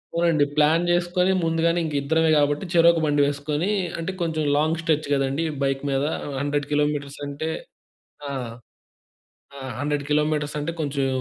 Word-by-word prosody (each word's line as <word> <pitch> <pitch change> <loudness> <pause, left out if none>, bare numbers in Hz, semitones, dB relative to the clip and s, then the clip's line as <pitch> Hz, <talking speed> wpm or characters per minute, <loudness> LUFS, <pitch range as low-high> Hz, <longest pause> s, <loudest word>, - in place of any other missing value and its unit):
అవునండి. 170 -4 +3
ప్లాన్ 155 +3 +4
చేసుకొని 175 +1 +2
ముందుగానే 165 +1 +1
ఇంక 155 - -4
ఇద్దరమే 160 +3 +2
కాబట్టి 145 +4 +1
చెరొక 170 0 +5
బండి 145 -1 +2
వేసుకొని 145 +5 -1 0.3
అంటే 165 +3 -3
కొంచెం 160 -2 -1
లాంగ్ 155 +2 +1
స్ట్రెచ్ 155 -2 0
కదండీ. 135 +3 0 0.2
బైక్ 135 0 0
మీద 135 0 0 0.4
100 145 0 -1
కిలోమీటర్స్ 145 -1 0
అంటే 145 +2 -4 0.8
ఆ! - - -4 1.3
ఆ! - - -9 0.2
100 145 0 -1
కిలోమీటర్స్ 150 0 0
అంటే 150 +3 -3
కొంచెం 140 -2 -1
150 Hz, 140 wpm, -24 LUFS, 145-165 Hz, 1.3 s, చెరొక